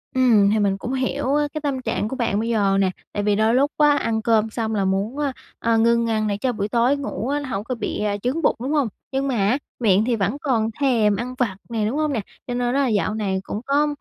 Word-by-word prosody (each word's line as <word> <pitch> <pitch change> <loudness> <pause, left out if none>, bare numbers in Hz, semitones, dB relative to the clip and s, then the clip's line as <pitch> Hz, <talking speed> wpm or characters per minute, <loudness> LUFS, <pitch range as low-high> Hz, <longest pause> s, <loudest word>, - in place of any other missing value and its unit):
Ừm, 225 -6 +5
hì 215 +1 +2
mình 195 -1 +1
cũng 245 +6 -5
hiểu 270 +1 0
á 295 0 +2
cái 310 - -4
tâm 275 -3 -2
trạng 210 - -2
của 265 - -4
bạn 230 -5 0
bây 230 +1 -2
giờ 200 -4 +2
nè. 190 -1 +2 0.2
Tại 205 - -2
vì 205 -1 +2
đôi 220 +3 +2
lúc 280 +3 +3
á, 295 -1 +5
ăn 220 -1 -1
cơm 225 -1 +2
xong 220 -1 -2
là 195 -1 +1
muốn 200 +8 -1
á, 285 -3 -1 0.3
a, 230 -1 +2
ngưng 235 0 +3
ăn 215 -1 0
để 200 -1 -1
cho 250 +4 0
buổi 205 -1 -2
tối 245 +5 +2
ngủ 275 -4 -4
á 290 +1 0
nó 280 -3 -6
hổng 195 -1 -3
có 255 +2 -3
bị 210 -1 -3 0.2
chướng 275 +7 0
bụng, - - +2
đúng 270 +4 -2
hông? 290 -6 +2 0.2
Nhưng 270 +1 -1
mà 260 - 0
á, 205 +7 +2 0.2
miệng 210 -2 +3
thì 245 -2 +1
vẫn 220 +7 -1
còn 230 -6 +1
thèm 225 -7 +3
ăn 250 +4 -4
vặt 225 -7 0
nè, 220 -2 -1
đúng 265 +7 -2
hông 305 -2 0
nè? 225 - -1 0.3
Cho 245 - -3
nên 245 - -2
đó 280 - +2
là 275 - +2
dạo 215 -1 0
này 195 -3 -1
cũng 210 - -5
có, 290 +2 +2
230 Hz, 275 wpm, -22 LUFS, 210-265 Hz, 0.3 s, Ừm